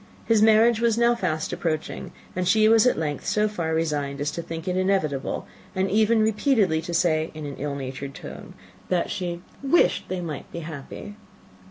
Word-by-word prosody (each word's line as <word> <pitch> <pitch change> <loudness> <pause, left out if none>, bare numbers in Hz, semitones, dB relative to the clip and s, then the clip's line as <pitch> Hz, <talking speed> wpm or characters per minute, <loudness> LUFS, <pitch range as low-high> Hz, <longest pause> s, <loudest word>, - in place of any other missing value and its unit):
His 225 -2 +3
marriage 220 +1 +5
was 230 -1 +2
now 235 0 +4
fast 175 -9 -2
approaching; 155 -2 -3 0.2
and 180 -1 -1
she 215 +3 +5
was 225 +2 +6
at - - +2
length 150 -3 -2
so 210 0 +2
far 170 -6 -3
resigned 145 -3 -1
as 145 +1 -1
to 170 - -4
think 165 +1 -7
it 180 - 0
inevitable, 185 -8 0 0.3
and 190 +1 0
even 220 +2 +4
repeatedly 215 - +2
to 170 - -6
say, 160 -2 +2
in 155 -1 -6
an 140 -1 -6
ill 145 0 -3
natured 135 0 -6
tone, - - -9 0.3
that 180 -2 0
she 175 -1 -4 0.2
"wished 275 +5 +3
they 185 0 -2
might 160 -5 -6
be 170 - -5
happy." 160 +6 -8
180 Hz, 185 wpm, -25 LUFS, 155-215 Hz, 0.3 s, was